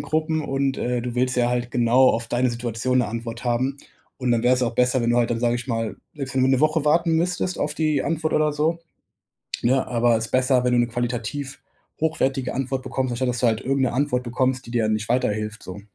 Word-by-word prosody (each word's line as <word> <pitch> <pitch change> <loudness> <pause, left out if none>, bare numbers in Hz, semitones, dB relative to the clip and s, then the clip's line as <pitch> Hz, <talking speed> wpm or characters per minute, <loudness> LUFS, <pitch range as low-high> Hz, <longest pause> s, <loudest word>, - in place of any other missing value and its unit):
Gruppen 155 0 -1
und, 135 -2 -1
äh, 125 -1 -1
du 120 0 -4
willst 125 0 0
ja 120 0 +2
halt 125 0 -1
genau 125 +2 +4
auf 115 0 -1
deine 125 +2 +1
Situation 120 +1 -1
'ne 120 -4 +1
Antwort 115 +2 -6
haben. 125 +3 0 0.4
Und 125 -2 -1
dann 115 -1 +2
wäre 125 +1 +4
es 125 - -1
auch 120 - -1
besser, 125 0 +2
wenn 115 - +1
du 120 - +2
halt 120 0 +1
dann 115 - -1
sage 120 0 +2
ich 120 - -7
mal, 115 -3 -2 0.2
selbst 135 -3 -5
wenn 130 - +2
du 130 - +4
'ne 130 0 +3
Woche 155 0 +2
warten 165 +2 +3
müsstest 180 +2 0
auf 150 0 -1
die 155 -3 +1
Antwort 160 -1 -1
oder 155 -1 +2
so, 155 +3 0 0.8
ne, 130 +2 +2
aber 120 -1 +2
ist 115 - -3
besser, 130 0 +3
wenn 125 - +2
du - - +3
'ne 120 - +1
qualitativ 125 +3 -4 0.4
hochwertige 135 -5 0
Antwort 130 0 -2
bekommst, 130 -1 -2
anstatt, 125 +2 -1
dass 125 0 -1
du 125 - +3
halt 110 -1 +1
irgend 135 +1 0
'ne 125 - 0
Antwort 130 -2 0
bekommst, 130 +1 -1
die 120 - -9
dir 120 -2 +1
dann 110 - +1
nicht 110 0 -2
weiterhilft, 110 -3 -1
so. 95 +2 -8
125 Hz, 240 wpm, -23 LUFS, 120-135 Hz, 0.8 s, genau